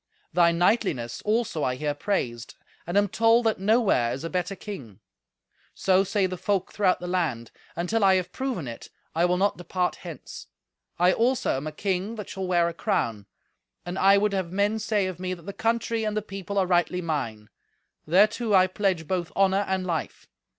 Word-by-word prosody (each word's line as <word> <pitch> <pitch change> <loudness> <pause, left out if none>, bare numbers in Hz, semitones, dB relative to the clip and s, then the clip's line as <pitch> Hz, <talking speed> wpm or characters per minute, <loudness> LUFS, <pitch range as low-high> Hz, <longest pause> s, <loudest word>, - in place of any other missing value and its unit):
Thy 170 0 +5
knightliness 170 - 0
also 215 -8 0
I 125 - 0
hear 145 +2 -2
praised, 125 - -3 0.3
and 175 +3 0
am 205 0 +4
told 230 +3 +3
that 220 -3 +1
nowhere 200 - +3
is 135 - -6
a 165 - -4
better 180 +2 -2
king. 135 - -9 0.8
So 190 0 +3
say 200 0 +1
the 185 -1 -4
folk 195 -1 -1
throughout 190 -3 +2
the 180 - -7
land; 165 -11 -2 0.2
and, 170 +1 -2
till 225 +2 +1
I 190 -1 +6
have 180 -1 -1
proven 255 - -3
it, 115 - -8 0.2
I 170 +2 +2
will 180 0 +2
not 200 +2 +1
depart 180 +1 -2
hence. - - -9 0.5
I 180 +2 +4
also 250 +3 +1
am 135 +3 -4
a - - -3
king 195 +6 -2
that 210 -3 -7
shall 190 -1 -4
wear 175 -2 +3
a 170 - -3
crown, 110 -9 -1 0.6
and 180 +2 -4
I 195 +1 +6
would 205 0 +1
have 190 -3 -2
men 205 +3 +1
say 215 -2 0
of 185 -2 -5
me 185 0 -3
that 170 - -16
the 200 - -6
country 230 0 0
and 215 0 -1
the 215 - -1
people 195 -1 -6
are 190 - +3
rightly 180 0 +1
mine. 115 -10 -3 0.6
Thereto 210 +5 +3
I 185 -1 +6
pledge 185 -4 -1
both 175 -1 -2
honour 195 +1 +3
and 190 -1 -1
life. 165 -4 -4
185 Hz, 195 wpm, -26 LUFS, 170-205 Hz, 0.8 s, I